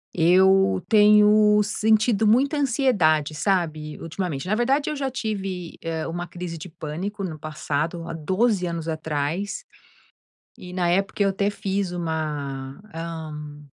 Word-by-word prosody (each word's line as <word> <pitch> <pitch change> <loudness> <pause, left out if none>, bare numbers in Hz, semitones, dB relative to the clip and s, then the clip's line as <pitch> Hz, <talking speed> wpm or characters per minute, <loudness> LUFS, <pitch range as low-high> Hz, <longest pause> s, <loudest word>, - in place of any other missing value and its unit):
Eu 180 - +4
tenho 210 0 +6
sentido 220 +1 +2
muita 265 +7 +3
ansiedade, 205 - +2
sabe, 155 -3 -1
ultimamente. 165 -3 -4
Na 200 - +1
verdade, 265 +7 +1
eu - - -3
já 275 -2 -2
tive, 195 -8 -4
eh, 165 -1 -3
uma 175 +1 -4
crise 175 -1 -6
de 165 +3 -8
pânico 175 +6 -5
no 160 -5 -5
passado, 155 +2 -3
há 165 - -5
12 185 +4 +1
anos 165 -1 -4
atrás 160 +4 -3 0.9
e 180 0 -10
na 180 -2 0
época 195 +3 0
eu 200 - +4
até 200 +1 0
fiz 195 -2 -2
uma, 150 -5 -4 0.2
hã, 155 -3 -7
180 Hz, 135 wpm, -24 LUFS, 155-210 Hz, 0.9 s, tenho